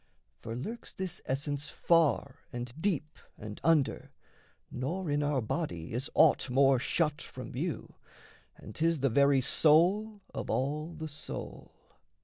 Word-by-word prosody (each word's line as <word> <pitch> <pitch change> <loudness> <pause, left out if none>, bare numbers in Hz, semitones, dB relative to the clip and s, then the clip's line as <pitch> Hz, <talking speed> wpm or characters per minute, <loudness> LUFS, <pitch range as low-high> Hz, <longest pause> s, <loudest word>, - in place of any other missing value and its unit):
For 115 - -6
lurks 220 - -6
this 190 -2 -5
essence 145 +2 -2
far 160 -5 +2
and 120 0 -5
deep 160 -6 -1 0.2
and 105 -1 -8
under, 160 -4 +2 0.6
Nor 160 +7 -3
in 145 0 +1
our 145 -2 +1
body 105 - -3
is 125 +5 -3
aught 155 -3 +5
more 135 0 +4
shut 150 +3 0
from - - -8
view, - - -4 0.6
And - - -11
'tis 165 -2 +1
the 135 -2 +2
very 140 +1 +4
soul 190 - +3
of - - -5
all 150 +5 -1
the 155 0 -5
soul. 150 0 -7
145 Hz, 135 wpm, -31 LUFS, 130-165 Hz, 0.6 s, aught